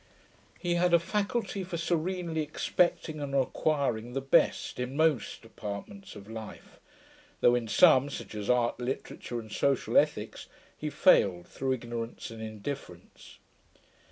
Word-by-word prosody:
He 175 -1 -1
had 175 0 +4
a - - +5
faculty 200 +2 -2
for 180 -1 -4
serenely 170 0 -1
expecting 155 +1 0
and 140 -1 -3
acquiring 130 -4 0
the 135 - 0
best, 135 -1 +2
in 125 +3 -3
most 155 -10 +1
departments 100 -2 -8
of 100 -1 -11
life, 110 -1 -9 0.6
though 120 - +6
in 120 -2 0
some 130 +5 +6
(such 140 - -7
as 105 -1 -5
art, 120 -1 +2
literature, 125 -1 -4
and 110 -2 -10
social 140 +4 +1
ethics) - - -2 0.3
he 155 - -4
failed 100 - +4
through 130 -1 -1
ignorance 115 -2 -5
and 115 -1 -8
indifference. 110 -4 -8
130 Hz, 135 wpm, -29 LUFS, 115-160 Hz, 0.6 s, though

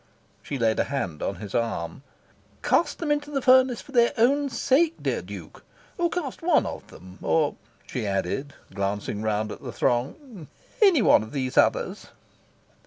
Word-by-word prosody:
She 140 - -5
laid 115 -3 +1
a - - +2
hand 95 - -3
on 100 - -2
his 105 -3 -9
arm. 85 -6 -2 0.6
"Cast 340 - +2
them 315 -3 -2
into 290 0 0
the 285 -2 -1
furnace 255 -1 +4
for - - -15
their 235 -3 +4
own 280 +5 +3
sake, 310 +6 +2
dear - - -1
Duke! - - -10 0.4
Or 345 0 +2
cast 320 -7 -4
one 330 -2 +3
of - - -6
them, 90 +2 -14
or," 155 -3 +2 0.3
she 110 0 -4
added, 100 +9 -2 0.2
glancing 100 +1 -2
round 110 0 -1
at - - -8
the 125 - -6
throng, 155 - -2 0.3
"any 370 - +6
one - - +6
of 110 +1 -9
these 130 -3 -2
others!" - - +2
140 Hz, 170 wpm, -25 LUFS, -, 0.6 s, any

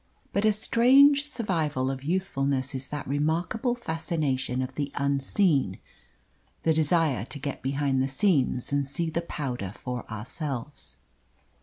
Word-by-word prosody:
But 200 - +1
a 215 - +6
strange 270 +7 +5
survival 155 - -1
of 135 0 -6
youthfulness 140 -6 -1
is 135 0 -4
that 145 -1 -5
remarkable 165 - 0
fascination 155 - -1
of 130 +1 -6
the 145 +1 -3
unseen 140 - +2 0.9
the 160 - +3
desire 155 - +2
to 145 - -5
get 140 0 -5
behind 135 0 0
the 135 - +1
scenes 135 -4 +1
and 140 -1 +1
see 160 +3 -2
the 170 - -1
powder 125 - -4
for 125 +3 -6
ourselves. 130 +4 -5
145 Hz, 135 wpm, -27 LUFS, 135-170 Hz, 0.9 s, a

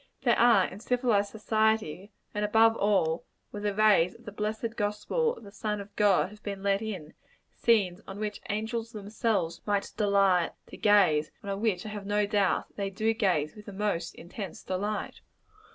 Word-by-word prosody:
There 240 -3 +3
are, 235 -5 +6
in 190 - -8
civilized 235 -4 +1
society 215 -3 0 0.2
and 210 - -1
above 225 +2 +5
all, 190 -6 +1 0.3
where 205 - -6
the 205 -1 -1
rays 210 -5 +4
of 235 - -18
the 205 - -6
blessed 215 +2 -3
gospel 210 - 0
of - - -14
the 200 - -11
Son 210 0 -3
of 200 0 -10
God 205 -2 +3
have 210 0 -14
been 200 -2 -5
let 200 0 +2
in 185 -8 -6 0.4
scenes 200 -5 +2
on 195 - -7
which 210 -1 -4
angels 225 +2 -3
themselves 205 -5 -1
might 205 -1 0
delight 195 -4 +3 0.2
to - - -10
gaze, 185 -8 +4
and 200 - -4
on 195 +1 -3
which 210 -5 0
I - - -4
have 205 -1 -6
no 205 0 +2
doubt 200 -2 0
they 200 -1 -1
do 215 +3 0
gaze 180 -9 0
with 210 -1 -13
the 205 - -7
most 190 -4 -2
intense 190 +3 -8
delight. 205 +3 -3
205 Hz, 185 wpm, -29 LUFS, 195-220 Hz, 0.4 s, are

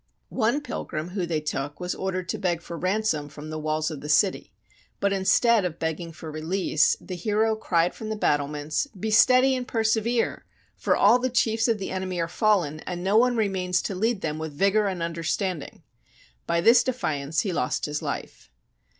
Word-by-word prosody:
One 240 +5 +1
pilgrim 175 - -5
whom 180 -2 -3
they 160 -2 0
took 145 -1 -4
was 180 0 -2
ordered 185 -1 -3
to 220 - -2
beg 175 -4 -1
for 170 - -7
ransom 185 -4 -1
from 150 +1 -9
the 155 - -4
walls 155 +1 -1
of 150 - -7
the 150 - -7
city, 185 +6 +2 0.5
but 200 0 +1
instead 210 +3 +3
of 170 -3 -3
begging 165 +1 -3
for 160 0 -9
release, 155 +1 +1
the 185 - -8
hero 215 +4 +1
cried 175 -5 +1
from 220 - -7
the 220 - -2
battlements, 150 - 0
" 195 - -16
Be 220 +2 -2
steady 255 +4 +5
and 250 -1 -4
persevere, 225 +1 0 0.3
for - - +1
all 245 - +5
the 255 +1 0
chiefs 225 -2 +1
of 230 -2 +2
the 195 - -5
enemy 185 -1 -3
are 165 - 0
fallen, 175 -6 +1
and 175 +1 -6
no 195 +2 +1
one 245 +2 +4
remains 185 -4 0
to 200 - -3
lead 215 +2 0
them 155 0 -3
with 160 -1 -5
vigour 200 +3 +3
and 185 -3 -3
understanding! 170 0 -3 0.3
" - - -31
By 170 0 +1
this 230 +7 +6
defiance 155 - -1
he 195 -4 -2
lost 125 -6 -1
his 150 0 -3
life. - - -6
185 Hz, 195 wpm, -25 LUFS, 155-220 Hz, 0.5 s, this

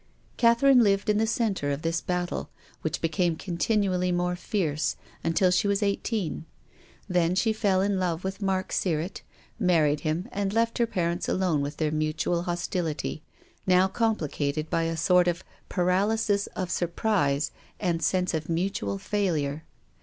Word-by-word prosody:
Catherine 245 +2 +5
lived 200 -1 +3
in 210 - +1
the 225 - +2
centre 215 - 0
of 140 +1 -2
this 165 0 0
battle, 180 -1 -2 0.3
which 160 0 -2
became 165 +1 +1
continually 180 +1 0
more 180 0 0
fierce, 155 -6 -1 0.3
un 165 - 0
til 180 +2 +3
she 200 +3 +2
was 200 +1 +1
eighteen. 200 -5 -2 0.6
Then 180 -2 +2
she 220 +3 +2
fell 200 -4 +2
in 200 -1 +1
love 175 -2 -1
with 190 +2 -4
Mark 190 -1 -1
Sirrett, 170 0 -1 0.4
married 155 -5 +3
him, 155 +4 -2
and 200 0 -2
left 230 +1 +1
her 235 - +3
parents 175 -4 -1
alone 180 -6 +1
with 145 +1 -4
their 155 -2 0
mutual 155 +2 0
hostility, 175 -3 -2 0.5
now 185 0 +5
compli 220 -5 0
cated 150 +2 -2
by 165 - +1
a 165 0 -2
sort 180 +2 +4
of 175 +1 -1 0.3
paralysis 200 +3 +1
of 185 -2 -3
surprise 170 -5 0 0.3
and 170 -4 0
sense 180 +3 +1
of 160 0 -3
mutual 165 - -1
failure. 160 - -1
180 Hz, 155 wpm, -27 LUFS, 160-200 Hz, 0.6 s, Catherine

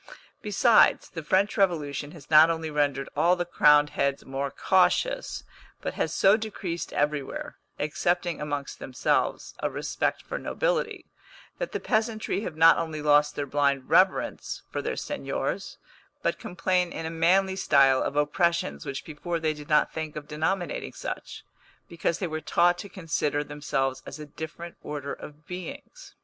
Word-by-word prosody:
Besides, 220 +2 +4
the 165 - -5
French 190 +8 +1
Revolution 150 -7 0
has 155 -3 -14
not 155 +1 +8
only 160 -1 -2
rendered 145 -2 0
all 175 +2 +4
the 175 -1 -2
crowned 150 -3 +5
heads 140 0 -1
more 135 +1 -3
cautious, 190 - +1 0.4
but - - -4
has - - -1
so 195 +1 +5
decreased 195 -6 -5
everywhere 145 -1 -2 0.2
(excepting 175 +3 -1
amongst 145 -2 -4
themselves) 130 - -1
a - - -1
respect - - -2
for - - -5
nobility, - - -1 0.5
that - - -3
the - - -2
peasantry 220 -2 -1
have 180 -7 -5
not 165 +1 +7
only 160 -2 -3
lost 150 0 +3
their 145 - -2
blind 140 -1 0
reverence 185 +3 +2
for - - -2
their - - -3
seigniors, - - -3 0.5
but - - 0
complain 180 -3 0
in 165 - -5
a 160 - -3
manly 185 +4 +3
style 135 -7 +4
of 140 - -2
oppressions 150 - 0
which 135 - -5
before 165 +2 -4
they 155 -1 0
did 150 0 -11
not 150 -1 +3
think 160 -1 -5
of 150 -1 -7
denominating 160 +3 -2
such, - - -6 0.4
because 170 -1 -1
they 190 - -2
were 155 -2 -4
taught 175 +2 +3
to 200 - -7
consider 150 -5 -1
themselves 135 -3 -2
as 135 - -7
a 150 - -8
different 160 +3 -8
order 145 -1 -5
of 150 0 -11
beings. 275 - -9
160 Hz, 160 wpm, -27 LUFS, 145-180 Hz, 0.5 s, not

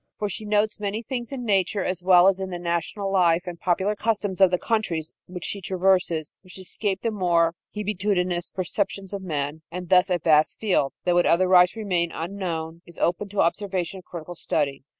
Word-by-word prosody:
For 210 - -2
she 215 +3 -5
notes 210 +1 +1
many 210 +2 -3
things 240 0 -5
in 255 -3 -5
nature, 195 -1 +1
as 185 -1 -2
well 180 0 +6
as 195 -1 +3
in 190 0 -4
the 180 - -4
national 175 +4 -2
life 175 -3 +3
and 175 -2 -7
popular 190 +4 0
customs 205 -3 -1
of 190 - +8
the 180 - +1
countries 175 -8 -2
which 180 -1 -7
she 200 - -4
traverses, 180 -4 +1
which 185 -1 -13
escape 190 +1 -3
the 230 - 0
more 170 -5 +2 0.2
hebetudinous 185 -4 -1
perceptions 195 +1 -2
of 200 - -4
men, 150 -3 -3
and 180 0 -7
thus 185 +1 +5
a 180 - +2
vast 155 -2 +3
field, 180 -10 +1
that 180 - +2
would 175 0 +3
otherwise 180 +1 +5
remain 180 -6 -1
unknown, 165 -2 -4
is 170 - -14
opened 180 +4 0
to 205 0 0
observation 185 +1 -1
and 185 - -12
critical 170 0 -8
study. 145 -5 -2
185 Hz, 190 wpm, -24 LUFS, 170-200 Hz, 0.2 s, of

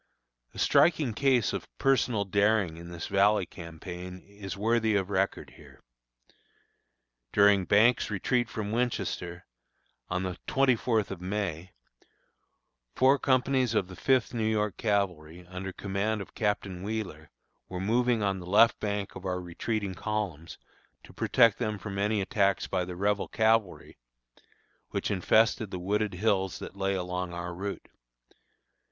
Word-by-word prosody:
A - - -10
striking 155 -8 +3
case 130 -3 +2
of - - -4
personal 125 -6 +2
daring 100 -3 +2
in 85 +1 -9
this 85 -1 -6
Valley 100 0 +3
campaign, 90 +2 -8
is 100 -1 -8
worthy 110 +1 +2
of 100 0 0
record 95 0 -1
here. - - -16 1.5
During 100 -2 +5
Banks' 110 +6 +4
retreat 120 +4 0
from 105 -2 -4
Winchester, 95 -7 -2 0.6
on 90 +1 -1
the 90 -2 -4
twenty 135 -2 +3
fourth 110 -3 0
of 95 -2 -6
May, 95 -3 -3 1.2
four 135 +2 +4
companies 130 -3 +2
of 95 -3 +1
the 95 - -9
Fifth 130 +2 +1
New 110 -2 0
York 105 -3 0
Cavalry, 90 -6 -2
under 90 +2 -6
command 100 +3 -2
of 100 - -8
Captain 100 -4 -2
Wheeler, 95 -7 -5 0.4
were 90 - -5
moving 115 +3 +1
on 100 -1 0
the 90 - -9
left 105 +5 +5
flank 100 -2 -3
of 95 - -9
our 90 -1 -2
retreating 95 +3 -3
columns, 95 -6 -4 0.5
to - - -15
protect 115 -4 +3
them 110 -3 -1
from 100 0 -6
any 105 +1 +1
attacks 100 0 +1
by 90 -1 -1
the 90 0 -7
Rebel 100 +2 0
cavalry, 110 -3 0 0.9
which - - -2
infested 110 +3 +2
the 90 - -5
wooded 105 +2 -1
hills 95 -2 0
that - - -9
lay 100 0 0
along 90 -1 -3
our 85 0 -5
route. 100 +3 -5
100 Hz, 145 wpm, -29 LUFS, 90-110 Hz, 1.5 s, During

